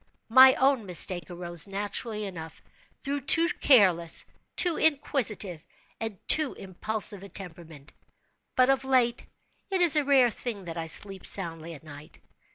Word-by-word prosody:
My 260 +3 +7
own 265 -5 +1
mistake 180 0 +1
arose, 175 -1 -5
naturally 205 +2 -4
enough, 160 -4 -9 0.4
through 280 0 -3
too 325 +5 +4
careless, 185 - +3 0.3
too 350 -3 +2
inquisitive, 225 - 0 0.4
and 225 -3 -5
too 310 -3 +3
impulsive 200 +1 -5
a 200 - -11
temperament. 165 -6 -11 0.6
But 255 +1 +4
of 270 -1 -1
late, 250 -3 0 0.4
it 380 -1 -1
is 345 -3 +3
a 300 - +2
rare 265 -4 +3
thing 210 -4 -7
that 165 -1 -7
I 165 -1 -5
sleep 195 +3 +1
soundly 165 -3 -5
at 145 - -15
night. 150 -1 -13
205 Hz, 145 wpm, -27 LUFS, 175-265 Hz, 0.6 s, My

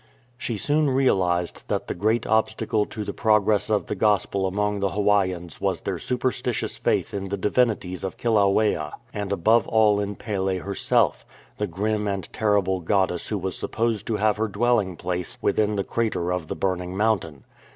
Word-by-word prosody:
She 120 -2 -3
soon 150 +6 +1
realized 90 -10 +1
that - - -1
the - - -3
great 110 +5 0
obstacle 110 -1 +1
to 110 - -5
the - - -5
pro 110 -1 +4
gress 105 +1 +1
of 105 -2 +1
the - - -3
Gospel 100 -1 +1
among 105 +2 -1
the 100 0 +1
Hawaiians 95 -4 0
was - - 0
their - - -3
superstitious 125 0 -2
faith - - 0
in 100 -1 -4
the 100 - -2
divinities 105 -3 0
of 95 - -4
Kilauea, 105 -8 +2 0.2
and 100 -1 -4
above 110 +5 +3
all 110 -2 +4
in 100 0 -3
Pele 95 -3 -2
herself, 100 +1 +1 0.4
the 105 - 0
grim 105 +4 -1
and 100 -3 -2
terrible 100 -3 +1
goddess 90 0 0
who 105 - -1
was 95 -1 -3
supposed 115 -2 -2
to 115 - 0
have 105 0 +2
her 110 +1 0
dwelling 105 -4 +1
place 90 0 -4
within 105 -1 +1
the 100 - 0
crater 100 -7 -1
of 90 -3 -3
the - - -4
burning 90 -1 -2
mountain. 95 - 0
105 Hz, 175 wpm, -24 LUFS, 95-110 Hz, 0.4 s, pro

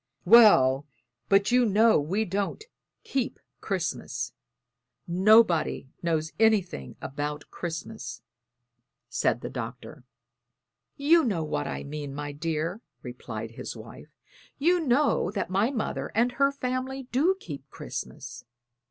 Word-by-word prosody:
"Well, 150 - +7 0.4
but 200 +2 +4
you 250 0 +5
know 220 -1 +4
we 190 +10 -1
don't 200 - -2 0.4
keep 265 -3 -2 0.2
Christmas; 185 -5 -3 0.7
nobody 180 -6 +4
knows 160 -2 -1
anything 195 - +1
about 145 +2 -5
Christmas," 175 +6 -6 0.9
said 120 - 0
the - - -5
Doctor. 125 +3 -7 0.9
"You 320 +4 +5
know 195 -9 0
what 75 - -2
I 70 0 -4
mean, 145 -1 -6
my 145 0 -4
dear," 165 +6 -3 0.2
replied 115 -3 -7
his 115 - -7
wife. 115 +7 -11 0.5
"You 350 +5 +3
know 285 - +2
that 200 -3 -3
my 200 +5 +2
mother 245 -6 -3
and 235 +3 +3
her 275 +2 +2
family 260 0 -3
do 320 +10 +3
keep 145 - -9
Christmas. 120 - -7
180 Hz, 115 wpm, -27 LUFS, 145-235 Hz, 0.9 s, Well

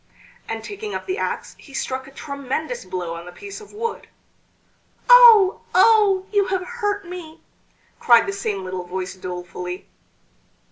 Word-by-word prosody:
And 225 0 -4
taking 415 +1 -6
up - - -5
the 375 +2 -3
axe - - -4
he 275 - -13
struck 260 0 -3
a - - -13
tremendous 280 - -5
blow 175 -2 -4
on 170 +1 -8
the - - -8
piece 400 - -9
of 425 - -14
wood. 455 +2 -4 1.0
"Oh! 465 -6 +8
oh! 415 -4 +5
you 405 -2 +2
have 375 -1 -1
hurt 415 -3 -3
me!" 345 -3 -9 0.6
cried 235 -1 +5
the 195 - -3
same 200 -1 -3
little 185 -1 -5
voice 185 +1 -5
dolefully. 180 0 -7
315 Hz, 150 wpm, -22 LUFS, -, 1.0 s, Oh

